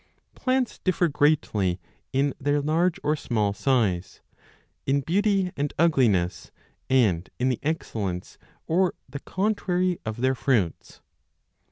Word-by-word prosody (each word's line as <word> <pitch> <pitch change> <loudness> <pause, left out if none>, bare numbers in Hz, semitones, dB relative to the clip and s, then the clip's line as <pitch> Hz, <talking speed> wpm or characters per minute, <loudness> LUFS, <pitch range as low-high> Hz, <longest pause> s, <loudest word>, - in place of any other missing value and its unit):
Plants 255 -1 -1
differ 185 -1 +1
35 160 - -2
greatly 105 - +2 0.3
in 140 +1 +1
their 145 +1 +1
large 160 +4 +1
or 150 +1 +2
small 105 -8 -1
size, 100 -7 0 0.7
in 140 +1 +2
beauty 195 +4 +1
and 145 0 -2
ugliness, 105 - +2 0.4
and 105 -10 +2
in 130 +1 +1
the 125 - -1
excellence, 110 - -3 0.3
or 180 +2 +1
the 140 - -7
contrary, 185 -2 0
of 110 +2 -5
their 130 +1 +3
fruits. 120 - -1
140 Hz, 125 wpm, -25 LUFS, 110-170 Hz, 0.7 s, their